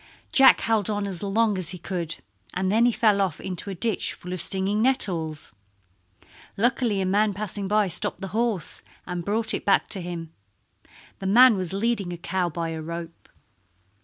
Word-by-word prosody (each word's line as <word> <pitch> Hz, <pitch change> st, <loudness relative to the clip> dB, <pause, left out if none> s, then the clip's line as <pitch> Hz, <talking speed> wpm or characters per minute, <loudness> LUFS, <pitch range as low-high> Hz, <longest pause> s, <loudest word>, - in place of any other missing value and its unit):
Jack 270 Hz, -1 st, +7 dB
held 220 Hz, -3 st, +1 dB
on 205 Hz, -1 st, -1 dB
as 185 Hz, -4 st, -6 dB
long 205 Hz, 0 st, +1 dB
as 175 Hz, -3 st, -5 dB
he 180 Hz, -, -4 dB
could, 170 Hz, -1 st, -3 dB, 0.4 s
and 185 Hz, +1 st, 0 dB
then 230 Hz, +3 st, +4 dB
he -, -, +3 dB
fell 215 Hz, -3 st, +2 dB
off 185 Hz, -6 st, -1 dB
into 190 Hz, +1 st, -4 dB
a 195 Hz, -, -4 dB
ditch 220 Hz, +2 st, 0 dB
full 180 Hz, +1 st, -8 dB
of 185 Hz, -, -3 dB
stinging 195 Hz, +4 st, +1 dB
nettles. 170 Hz, -, 0 dB, 1.1 s
Luckily 230 Hz, -2 st, +1 dB
a -, -, 0 dB
man 205 Hz, +2 st, +2 dB
passing 200 Hz, -1 st, -4 dB
by 210 Hz, 0 st, +2 dB
stopped 180 Hz, 0 st, -2 dB
the 195 Hz, -, -5 dB
horse 220 Hz, -3 st, -2 dB, 0.2 s
and 180 Hz, -2 st, -4 dB
brought 220 Hz, +4 st, +1 dB
it -, -, -2 dB
back 200 Hz, -, +2 dB
to 195 Hz, -, -3 dB
him. 170 Hz, -2 st, -6 dB, 0.9 s
The 190 Hz, -, -4 dB
man 240 Hz, +4 st, +7 dB
was 185 Hz, -3 st, -3 dB
leading 200 Hz, -2 st, -1 dB
a 175 Hz, -, -5 dB
cow 180 Hz, +1 st, -1 dB
by 165 Hz, 0 st, -3 dB
a 160 Hz, -1 st, -5 dB
rope. 170 Hz, +1 st, -8 dB
195 Hz, 185 wpm, -25 LUFS, 175-215 Hz, 1.1 s, Jack